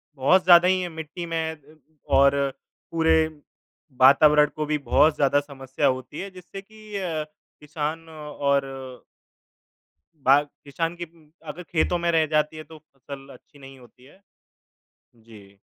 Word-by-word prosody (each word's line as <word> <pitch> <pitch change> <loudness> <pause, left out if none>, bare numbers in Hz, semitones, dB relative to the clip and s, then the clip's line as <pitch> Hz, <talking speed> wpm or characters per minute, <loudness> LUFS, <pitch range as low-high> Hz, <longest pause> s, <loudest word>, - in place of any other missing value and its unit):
बहुत 165 +8 +3
ज़्यादा 175 0 +7
ही 185 0 +2
है 180 - -4
मिट्टी 160 +2 -8
में 165 -1 -2
अ, 150 +1 -22 0.3
और 140 +1 +4 0.6
पूरे 160 -1 +2 0.9
वातावरण 150 +3 +6
को 155 - -3
भी 150 0 -1
बहुत 150 +3 +2
ज़्यादा 145 0 +2
समस्या 140 0 -3
होती 130 +2 -3
हैं 195 +1 -6
जिससे 185 +2 -10
कि 215 +1 -13
अ, 165 -5 -3 0.4
किसान 155 +2 -5
और 145 -3 -2 1.5
बाग 140 0 +3 0.2
किसान 165 +4 -3
के 175 - -5
उ 160 -2 -23 0.2
अगर 180 - -7
खेतों 175 +1 -1
में 170 0 0
रह 160 -1 +2
जाती 155 +1 +1
है 155 - -7
तो 160 0 -14
फसल 140 -2 -13
अच्छी 145 - -19
नहीं 135 -1 -13
होती 125 0 -20
है। 145 +8 -20 1.0
जी, 105 -4 -18
150 Hz, 150 wpm, -24 LUFS, 140-165 Hz, 1.5 s, ज़्यादा